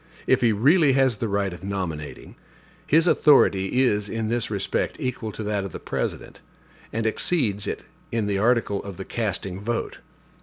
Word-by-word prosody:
If -, -, +3 dB
he 120 Hz, -2 st, +4 dB
really 140 Hz, -, +4 dB
has 130 Hz, -4 st, +3 dB
the 115 Hz, -, -2 dB
right 100 Hz, -2 st, -1 dB
of 90 Hz, -, -11 dB
nominating, 90 Hz, -7 st, -5 dB, 0.5 s
his 160 Hz, +3 st, +4 dB
authority 130 Hz, -, +4 dB
is 105 Hz, -4 st, +1 dB
in 115 Hz, -1 st, -2 dB
this 120 Hz, 0 st, 0 dB
respect 100 Hz, -3 st, -2 dB
equal 120 Hz, -3 st, -3 dB
to 110 Hz, -, -6 dB
that 105 Hz, -1 st, -1 dB
of 95 Hz, -, -7 dB
the -, -, -6 dB
President, -, -, -4 dB, 0.5 s
and 115 Hz, 0 st, -2 dB
exceeds 110 Hz, -, +1 dB
it -, -, -4 dB, 0.3 s
in 115 Hz, -2 st, 0 dB
the 100 Hz, -1 st, 0 dB
article 115 Hz, -2 st, +1 dB
of 100 Hz, -3 st, -8 dB
the 95 Hz, -, -6 dB
casting 95 Hz, -4 st, -3 dB
vote. 115 Hz, +3 st, -3 dB
110 Hz, 175 wpm, -24 LUFS, 100-120 Hz, 0.5 s, he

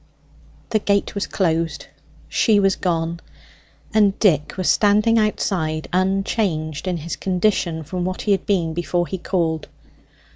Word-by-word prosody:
The 215 Hz, -, +3 dB
gate 200 Hz, -1 st, 0 dB
was 200 Hz, -, -2 dB
closed; 165 Hz, -4 st, -1 dB, 0.4 s
she 215 Hz, -3 st, +3 dB
was 195 Hz, -1 st, +3 dB
gone; 170 Hz, -1 st, -1 dB, 0.7 s
and 205 Hz, -2 st, +3 dB
Dick 155 Hz, -8 st, +2 dB
was 185 Hz, -, -1 dB
standing 215 Hz, +2 st, +4 dB
outside, 160 Hz, -7 st, -1 dB
unchanged 185 Hz, -4 st, 0 dB
in 180 Hz, -1 st, 0 dB
his 165 Hz, +1 st, -5 dB
condition 180 Hz, -3 st, 0 dB
from 180 Hz, +4 st, -4 dB
what 185 Hz, +1 st, -3 dB
he 210 Hz, -, +1 dB
had 195 Hz, -2 st, +1 dB
been 175 Hz, -5 st, +1 dB
before 175 Hz, +1 st, -1 dB
he 190 Hz, +1 st, -5 dB
called. 165 Hz, -4 st, -1 dB
185 Hz, 140 wpm, -21 LUFS, 165-200 Hz, 0.7 s, standing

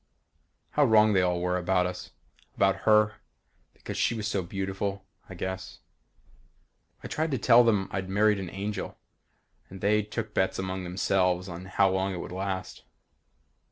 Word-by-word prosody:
How 150 Hz, -, +3 dB
wrong 110 Hz, -4 st, +5 dB
they 95 Hz, -, +4 dB
all 90 Hz, -1 st, +1 dB
were 90 Hz, +1 st, 0 dB
about 90 Hz, 0 st, +1 dB
us. 90 Hz, 0 st, -5 dB, 0.5 s
About 95 Hz, 0 st, +1 dB
her. 105 Hz, -1 st, +4 dB, 0.6 s
Because -, -, -7 dB
she -, -, +1 dB
was 105 Hz, -2 st, -3 dB
so 100 Hz, -2 st, -1 dB
beautiful, 95 Hz, +2 st, -4 dB, 0.2 s
I -, -, -8 dB
guess. 95 Hz, 0 st, -5 dB, 1.3 s
I -, -, -5 dB
tried 160 Hz, +1 st, -1 dB
to 135 Hz, -, 0 dB
tell 120 Hz, 0 st, +6 dB
them 105 Hz, -5 st, +2 dB
I'd 95 Hz, -1 st, -3 dB
married 105 Hz, +1 st, +3 dB
an 95 Hz, -2 st, -5 dB
angel 100 Hz, 0 st, -5 dB, 0.7 s
and 95 Hz, -, -10 dB
they 105 Hz, +3 st, +2 dB
took 105 Hz, +1 st, -5 dB
bets 95 Hz, -, +1 dB
among 95 Hz, -1 st, -3 dB
themselves 90 Hz, 0 st, +1 dB
on 90 Hz, 0 st, -7 dB
how 95 Hz, 0 st, +2 dB
long 95 Hz, 0 st, -1 dB
it -, -, -5 dB
would -, -, -7 dB
last. 95 Hz, 0 st, -4 dB
95 Hz, 160 wpm, -28 LUFS, 95-105 Hz, 1.3 s, tell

